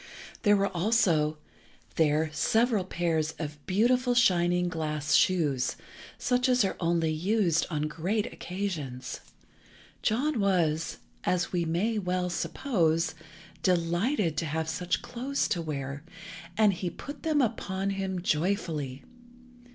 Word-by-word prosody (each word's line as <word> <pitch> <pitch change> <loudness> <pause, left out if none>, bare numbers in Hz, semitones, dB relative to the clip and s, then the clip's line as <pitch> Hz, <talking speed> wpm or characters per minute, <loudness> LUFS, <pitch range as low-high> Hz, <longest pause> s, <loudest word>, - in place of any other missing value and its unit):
There 205 -1 +5
were 195 -1 0
also 170 -6 +2 0.6
there 155 0 +2
several 225 +2 +2
pairs 165 -4 0
of 150 -2 -6
beautiful 245 +5 +3
shining 180 -6 +3
glass 155 -3 -2
shoes, 160 - +3 0.4
such 250 +1 +1
as 250 -4 +4
are 190 - -1
only 165 -2 +1
used 175 +1 +1
on 150 -3 -1
great 175 +8 -1
occasions. 155 -10 -4 0.8
John 255 +4 +1
was, 170 -5 +1 0.3
as 180 -1 0
we 175 -2 0
may 200 +7 0
well 180 -1 -1
suppose, 170 - 0 0.5
delighted 175 - +1
to 165 - 0
have 160 +1 -2
such 175 +2 -1
clothes 265 +3 -2
to 175 - 0
wear, 140 -3 -4 0.6
and 215 -2 +5
he 180 0 -3
put 285 +10 -9
them 310 -2 +1
upon 200 -5 -1
him 190 -2 -3
joyfully. 155 -6 -1
180 Hz, 120 wpm, -28 LUFS, 160-210 Hz, 0.8 s, There